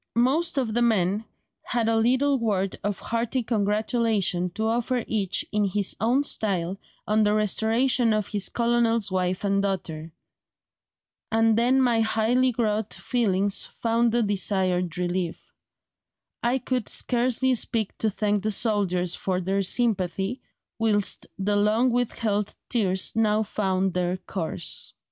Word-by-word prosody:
Most 295 +7 +2
of 240 -5 0
the 240 - +1
men 210 -2 +1 0.4
had 235 -2 -1
a 225 - +2
little 260 +5 +2
word 195 -4 -1
of 205 0 -1
hearty 235 +2 -2
congratulation 210 -4 0
to 220 - -1
offer 240 +2 0
each 200 -4 0
in 210 -1 +1
his 200 0 -1
own 240 +7 +2
style 195 -8 -2 0.3
on 215 +1 +3
the 210 0 +2
restoration 225 +3 +2
of 215 -1 +1
his 205 -2 0
colonel's 235 -3 +1
wife 185 0 -1
and 200 0 +1
daughter; 165 -5 -3 1.2
and 225 0 +3
then 245 +4 +3
my 235 -3 +2
highly 230 +3 +1
wrought 215 -2 0
feelings 205 -5 0
found 230 0 0
the 235 0 +2
desired 185 -4 0
relief; 180 -1 -3 0.9
I 240 +2 +1
could 255 -3 -3
scarcely 255 +1 +1
speak 225 -3 -1
to 220 - +1
thank 205 0 0
the 215 - -1
soldiers 195 -5 +1
for 185 -1 -2
their 190 +2 0
sympathy, 195 +1 0 0.4
whilst 205 -4 +1
the 205 +1 0
long 220 +5 +2
withheld 220 -4 -1
tears 190 -6 +1
now 215 -1 +2
found 190 -3 -1
their 180 0 -1
course." 185 -3 -4
215 Hz, 135 wpm, -25 LUFS, 195-235 Hz, 1.2 s, on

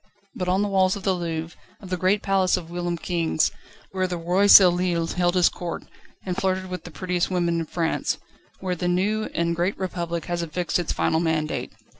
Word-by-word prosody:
But 180 - -4
on 190 +3 +2
the - - 0
walls 190 -1 +2
of 200 - -8
the 190 - +2
Louvre, 165 -1 -4 0.2
of 190 -2 -11
the - - +2
great 185 +3 +1
palace 190 -2 +2
of 170 -2 -8
whilom 175 0 -2
kings, 165 -2 0 0.4
where 185 -1 0
the 180 -1 -3
Roi 180 +4 +2
Soleil 180 -3 +6
held 175 +1 0
his 180 -1 +5
Court, 175 -1 -4 0.4
and 180 -2 -2
flirted 185 0 -1
with 180 -2 -6
the - - -7
prettiest 180 +1 -1
women 170 -2 0
in 165 - -2
France, 165 -1 -1 0.5
there 185 -1 -1
the 175 0 -2
new 205 +5 +1
and 170 0 0
great 175 +4 -1
Republic 170 -3 -3
has 175 -1 -2
affixed 170 +2 -1
its 175 - -2
final 160 - +1
mandate. 160 -2 -1
180 Hz, 200 wpm, -24 LUFS, 170-185 Hz, 0.5 s, Soleil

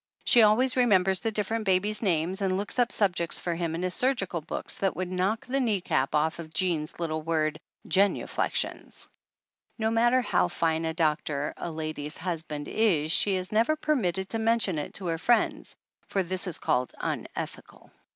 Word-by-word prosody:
She 240 - +6
always 225 +5 +4
re 250 -1 +4
members 190 -2 +3
the 225 - -2
different 215 +1 -1
babies' 205 +2 +1
names 180 -1 0
and 190 -1 +1
looks 205 +5 -2
up 245 0 +3
subjects 175 -5 +1
for 175 - -2
him 165 -1 -2
in 170 - -3
his 185 0 0
surgical 205 -10 0
books 155 - -3
that 195 -1 0
would 185 0 -3
knock 190 +5 0
the 270 +2 -1
knee 225 -6 +1
cap 135 -6 0
off 160 +2 +1
of 160 -1 -9
Jean's 170 -5 -1
little 155 -2 -2
word, 155 -1 0 0.3
"genuflections." 200 +1 0 0.7
No 220 -1 0
matter 240 +3 +3
how 180 - +2
fine 165 -1 0
a 160 - -1
doctor 150 -3 0
a - - -5
lady's 155 -1 -4
husband 160 -4 -4
is 165 -9 +2
she 195 +2 +3
is 185 0 -4
never 230 +8 +3
permitted 195 - 0
to 225 - -2
mention 220 -7 +2
it 145 - -6
to 195 - -5
her 165 -1 -1
friends, 240 +5 +1 0.3
for 195 - 0
this 185 +2 -3
is 175 - -1
called 125 0 0
"unethical." - - -6
185 Hz, 180 wpm, -27 LUFS, 160-215 Hz, 0.7 s, She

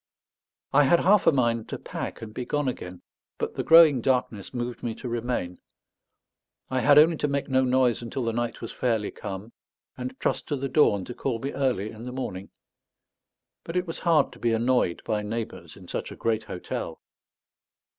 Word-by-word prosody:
I 145 +1 +6
had 170 +5 +4
half 200 0 +4
a - - +8
mind 120 -5 0
to - - -4
pack - - -6
and 110 -1 -8
be 125 - -4
gone 145 +2 -1
again, 90 -8 -5 0.3
but - - -3
the - - -2
growing 160 -6 +7
darkness 125 -6 0
moved 120 -1 -4
me 115 -2 -3
to 125 - -7
remain. 120 -7 -3 1.1
I 130 - +1
had 145 +3 +5
only 160 +2 +6
to 150 - 0
make 140 -1 -1
no 130 0 +3
noise 125 -2 +2
until 120 +2 -4
the 115 -1 -1
night 120 0 -2
was 115 - -5
fairly 115 -4 -1
come, 100 +4 -7 0.4
and 130 +1 -6
trust - - -1
to 145 - -1
the 135 0 -3
dawn 105 -9 +3
to 125 - -7
call 125 -1 -2
me 135 +5 -4
early 125 -7 -1
in 110 +2 -10
the 125 - -5
morning. 100 -7 -5 1.1
But 165 +2 -4
it 180 - 0
was 165 - -6
hard 165 -3 +3
to - - -15
be 115 -1 +1
annoyed 115 -6 +1
by 105 -1 0
neighbours 105 -6 -5
in 95 -2 -14
such - - -4
a - - -8
great 110 -1 -1
hotel. 90 -4 -5
125 Hz, 195 wpm, -26 LUFS, 110-135 Hz, 1.1 s, a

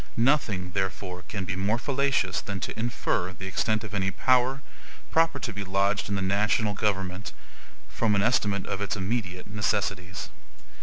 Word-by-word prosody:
Nothing, 115 -8 +2
therefore, 95 -1 -2
can 100 -4 -3
be 95 0 -2
more 100 +4 +1
fallacious 135 - +1
than 100 -1 -4
to - - -2
infer 100 -6 0
the 90 - -8
extent 110 +3 0
of 110 -2 -7
any 95 -1 +1
power, 130 +8 +2 0.5
proper 165 -2 +4
to 115 - -4
be 100 0 -4
lodged 100 +2 +1
in 100 - 0
the 95 - -1
national 105 +2 +2
government, 95 -1 -1 0.5
from 110 -3 +1
an 100 - +3
estimate 105 -5 +2
of 100 - -3
its 100 +2 -1
immediate 95 -2 -2
necessities. 100 -3 -1
100 Hz, 160 wpm, -27 LUFS, 95-115 Hz, 0.5 s, proper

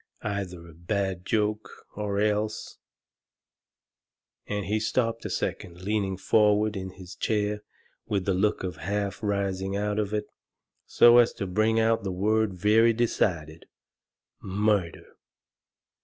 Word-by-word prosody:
Either 95 -5 -4
a 85 - -14
bad 95 +2 -2
joke, 105 -1 -2
or 100 -1 -2
else 105 0 -1 0.8
" - - -55
And 105 -1 -2
he 105 +2 0
stopped 115 +1 -1
a - - -2
second, 90 +1 -4
leaning 100 -2 -1
forward 105 +1 +3
in 95 -1 -4
his 95 -1 -11
chair, 105 0 -1 0.5
with 100 -3 -1
the 100 - +1
look 95 +3 +1
of 90 -3 -4
half 100 +5 -3
raising 100 -2 -1
out 105 +1 -1
of 105 -1 -1
it, 105 -1 -1 0.6
so 120 0 +7
as 120 -1 +4
to 100 - -4
bring 110 +4 +1
out 115 -1 +2
the 95 - -2
word 105 +2 +1
very 110 +5 +4
decided 85 -9 -1 0.7
"MURDER!" 100 -2 0
105 Hz, 135 wpm, -27 LUFS, 95-110 Hz, 0.8 s, so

